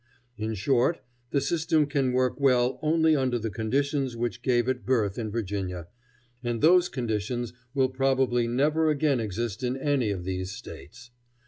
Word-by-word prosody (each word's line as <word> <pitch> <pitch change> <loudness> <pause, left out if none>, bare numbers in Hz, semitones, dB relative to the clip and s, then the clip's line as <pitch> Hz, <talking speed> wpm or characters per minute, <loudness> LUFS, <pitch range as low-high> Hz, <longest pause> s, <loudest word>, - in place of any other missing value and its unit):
In 110 0 -3
short, 125 - +1 0.3
the 140 - +1
system 160 0 +1
can 140 -3 0
work 130 +2 0
well 130 -2 +3
only 160 0 +3
under 130 -3 +1
the 115 -1 -4
conditions 135 +3 -1
which 120 -4 -3
gave 120 -2 +1
it 130 -1 -1
birth 110 -5 0
in 110 -2 -3
Virginia, 95 -5 -4 0.5
and 120 -1 -2
those 175 +5 +5
conditions 120 0 -3 0.2
will 130 -1 +3
probably 130 -2 +1
never 150 +6 +2
again 145 -3 +2
exist 110 +1 -3
in 125 +1 -1
any 135 -5 +1
of 95 -3 -3
these 95 0 -3
States. 120 - -11
125 Hz, 155 wpm, -27 LUFS, 110-140 Hz, 0.5 s, those